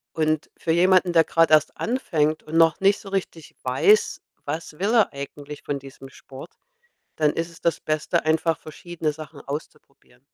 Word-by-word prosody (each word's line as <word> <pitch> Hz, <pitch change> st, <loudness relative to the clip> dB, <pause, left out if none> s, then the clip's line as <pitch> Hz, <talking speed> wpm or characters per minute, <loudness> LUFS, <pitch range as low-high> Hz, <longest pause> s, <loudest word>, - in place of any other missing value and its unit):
Und 155 Hz, -1 st, 0 dB
für 165 Hz, -, -1 dB
jemanden, 180 Hz, +1 st, +4 dB
der 165 Hz, -1 st, +6 dB
grad 165 Hz, -1 st, +2 dB
erst 155 Hz, -1 st, +4 dB
anfängt 160 Hz, -, 0 dB
und 155 Hz, +1 st, -5 dB
noch 165 Hz, -2 st, +4 dB
nicht 195 Hz, +1 st, +4 dB
so 200 Hz, -, -11 dB
richtig 180 Hz, -5 st, -4 dB
weiß: 415 Hz, -, +3 dB, 0.2 s
Was 155 Hz, +3 st, -5 dB
will 200 Hz, +4 st, 0 dB
er 225 Hz, -4 st, +4 dB
eigentlich 145 Hz, +1 st, -8 dB
von 145 Hz, -1 st, -3 dB
diesem 135 Hz, 0 st, -12 dB
Sport, 135 Hz, 0 st, -12 dB, 0.7 s
dann 150 Hz, -1 st, +2 dB
ist 165 Hz, +1 st, -3 dB
es 165 Hz, -, -16 dB
das 170 Hz, -, 0 dB
Beste, 155 Hz, -1 st, -1 dB
einfach 160 Hz, +1 st, +1 dB
verschiedene 160 Hz, 0 st, -5 dB
Sachen 155 Hz, -1 st, -11 dB
auszuprobieren. 140 Hz, -3 st, -9 dB
160 Hz, 170 wpm, -23 LUFS, 150-175 Hz, 0.7 s, der